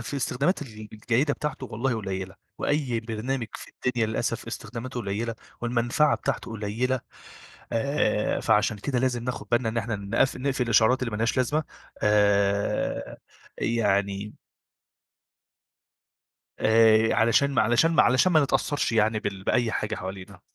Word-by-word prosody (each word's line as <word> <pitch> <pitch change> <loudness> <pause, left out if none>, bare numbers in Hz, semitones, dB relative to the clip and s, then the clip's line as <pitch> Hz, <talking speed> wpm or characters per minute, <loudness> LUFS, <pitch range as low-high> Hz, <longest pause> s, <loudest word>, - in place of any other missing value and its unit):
في 130 +5 -5
استخدامات 140 +6 0
ال 110 -5 -10
الجيدة 125 +7 0
بتاعته 145 -3 -4
والله 120 +2 -1
قليلة، 95 -3 -4 0.2
وأي 135 -6 0
برنامج 115 +2 -3
في - - -9 0.2
الدنيا 120 -3 +1
للأسف 110 - -2
استخداماته 125 +1 -6
قليلة، 115 +2 -3 0.3
والمنفعة 120 +5 +2
بتاعته 135 - -3
قليلة 115 +4 -1 0.7
آآ، 115 -3 0
فعشان 105 0 +2
كده 125 +4 -2
لازم 125 -2 0
ناخد 125 -1 -4
بالنا 120 -1 +2
إن 110 - -3
إحنا 115 -1 -1
نقف 100 +6 0
نِقفِل 135 -1 -1
الإشعارات 115 +2 +4
اللي 115 - -1
مالهاش 110 +2 -1
لازمة 145 +5 +1 0.4
آآ، 100 -1 +1 0.4
يعني 100 -2 0 2.3
آآ 110 0 +5
علشان 115 +5 +3
ما - - +4
علشان 120 +9 +3
ما - - +5
علشان 130 +9 +3
ما 155 - +6
نتأثرش 145 -1 0
يعني 110 0 +2
بال 95 -2 -5
بأي 120 -2 +1
حاجة 105 - -2
حوالينا. 95 0 -8
115 Hz, 135 wpm, -26 LUFS, 105-130 Hz, 2.3 s, ما